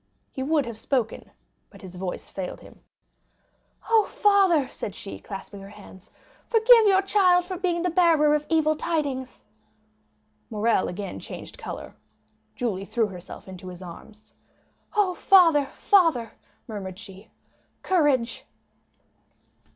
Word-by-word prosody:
He 265 Hz, -, -6 dB
would 290 Hz, +1 st, +1 dB
have 230 Hz, -2 st, -7 dB
spoken, 240 Hz, -4 st, -2 dB, 0.4 s
but -, -, -16 dB
his 185 Hz, -1 st, -10 dB
voice 180 Hz, 0 st, -5 dB
failed 185 Hz, -2 st, -6 dB
him. -, -, -16 dB, 1.1 s
"Oh, 445 Hz, -2 st, +4 dB
father!" 385 Hz, -9 st, +3 dB
said 200 Hz, -, -7 dB
she, 195 Hz, -, -8 dB
clasping 195 Hz, 0 st, -9 dB
her 195 Hz, -, -11 dB
hands, 200 Hz, -2 st, -15 dB, 0.4 s
"forgive 455 Hz, 0 st, +6 dB
your 390 Hz, -1 st, +4 dB
child 365 Hz, -3 st, +3 dB
for 370 Hz, +1 st, -5 dB
being 345 Hz, -2 st, -1 dB
the 360 Hz, -, 0 dB
bearer 325 Hz, -4 st, +4 dB
of 300 Hz, 0 st, -1 dB
evil 310 Hz, -1 st, +2 dB
tidings." 285 Hz, -6 st, -3 dB, 1.1 s
Morrel 215 Hz, -1 st, +1 dB
again 195 Hz, +2 st, -6 dB
changed -, -, -10 dB
color. -, -, -7 dB, 0.6 s
Julie 210 Hz, -7 st, -2 dB
threw 225 Hz, +3 st, 0 dB
herself 180 Hz, 0 st, -11 dB
into 185 Hz, -1 st, -10 dB
his 180 Hz, 0 st, -9 dB
arms. 215 Hz, +5 st, -13 dB, 0.6 s
"Oh, 405 Hz, -3 st, +2 dB
father, 330 Hz, -7 st, +5 dB
father!" 325 Hz, -, +2 dB, 0.4 s
murmured 190 Hz, -4 st, -7 dB
she, 200 Hz, 0 st, -13 dB, 0.5 s
"courage!" 290 Hz, -10 st, +1 dB
270 Hz, 130 wpm, -25 LUFS, -, 1.1 s, forgive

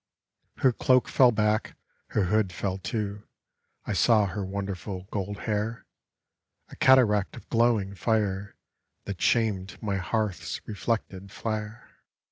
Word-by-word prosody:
Her 130 Hz, -2 st, +3 dB
cloak 130 Hz, +2 st, +3 dB
fell 125 Hz, -2 st, +5 dB
back; 105 Hz, 0 st, 0 dB, 0.3 s
her 105 Hz, -, 0 dB
hood 100 Hz, +1 st, +1 dB
fell, 95 Hz, +1 st, -3 dB
too; 105 Hz, 0 st, -4 dB, 0.6 s
I -, -, -2 dB
saw 110 Hz, -3 st, +4 dB
her 100 Hz, +1 st, -3 dB
wonderful 95 Hz, -1 st, -4 dB
gold 100 Hz, 0 st, -4 dB
hair, 110 Hz, +2 st, -2 dB, 0.8 s
A -, -, -11 dB
cataract 110 Hz, -7 st, +4 dB
of -, -, -12 dB
glowing 115 Hz, -4 st, +2 dB
fire 100 Hz, -2 st, -1 dB, 0.5 s
That 100 Hz, -3 st, -6 dB
shamed 105 Hz, -5 st, +1 dB
my 100 Hz, -3 st, -2 dB
hearth's 100 Hz, -1 st, -2 dB
reflected 100 Hz, -3 st, -3 dB
flare. 110 Hz, 0 st, -5 dB
105 Hz, 120 wpm, -27 LUFS, 95-110 Hz, 0.8 s, fell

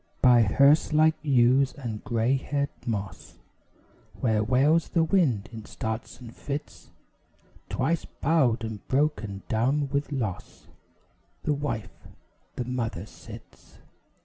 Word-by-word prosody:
By 125 Hz, -2 st, +6 dB
hearse 140 Hz, +9 st, +4 dB
like 155 Hz, +1 st, +5 dB
yews 135 Hz, -2 st, +3 dB
and 120 Hz, -8 st, -6 dB
grey 120 Hz, +1 st, +1 dB
haired 140 Hz, +1 st, -2 dB, 0.2 s
moss, 100 Hz, -, -5 dB, 0.8 s
Where 110 Hz, -4 st, +1 dB
wails 140 Hz, +8 st, +3 dB
the 165 Hz, -, +2 dB
wind 155 Hz, -, +1 dB
in 110 Hz, -2 st, -8 dB
starts 110 Hz, +1 st, -5 dB
and 120 Hz, -2 st, -11 dB
fits, 145 Hz, +1 st, -6 dB, 0.8 s
Twice 165 Hz, 0 st, -1 dB
bowed 135 Hz, -7 st, +1 dB
and 110 Hz, -2 st, -5 dB
broken 110 Hz, -9 st, -1 dB
down 135 Hz, +6 st, +1 dB
with 140 Hz, +2 st, -2 dB
loss, 110 Hz, -10 st, -5 dB, 0.8 s
The 150 Hz, -, +1 dB
wife, 140 Hz, -7 st, -5 dB, 0.5 s
the 125 Hz, -, -3 dB
mother 115 Hz, -7 st, -3 dB
sits. -, -, -14 dB
125 Hz, 120 wpm, -26 LUFS, 110-145 Hz, 0.8 s, By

